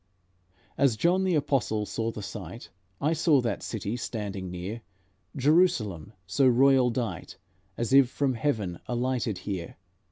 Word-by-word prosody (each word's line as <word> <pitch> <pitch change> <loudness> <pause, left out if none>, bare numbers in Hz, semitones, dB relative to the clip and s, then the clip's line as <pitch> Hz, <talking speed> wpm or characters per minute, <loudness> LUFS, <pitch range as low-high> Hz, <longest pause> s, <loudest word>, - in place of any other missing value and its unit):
As 130 -6 +3
John 180 - +2
the 185 -3 +2
Apostle 135 -7 0
saw 115 +2 -2
the 110 -2 -6
sight, 105 +3 -8 0.3
I 150 +3 +1
saw 155 -3 +3
that 115 -4 -2
city, 110 0 -4
standing 100 -6 -5
near 90 +6 -6 0.5
Jerusalem, 125 - +2
so 135 +9 +2
royal 130 0 +5
dight, 115 -9 -4 0.4
As 120 +2 -1
if 135 -2 +6
from 135 0 0
Heaven 110 -9 -2
alighted 120 -4 -1
here. 95 -5 -5
120 Hz, 135 wpm, -27 LUFS, 105-140 Hz, 0.5 s, if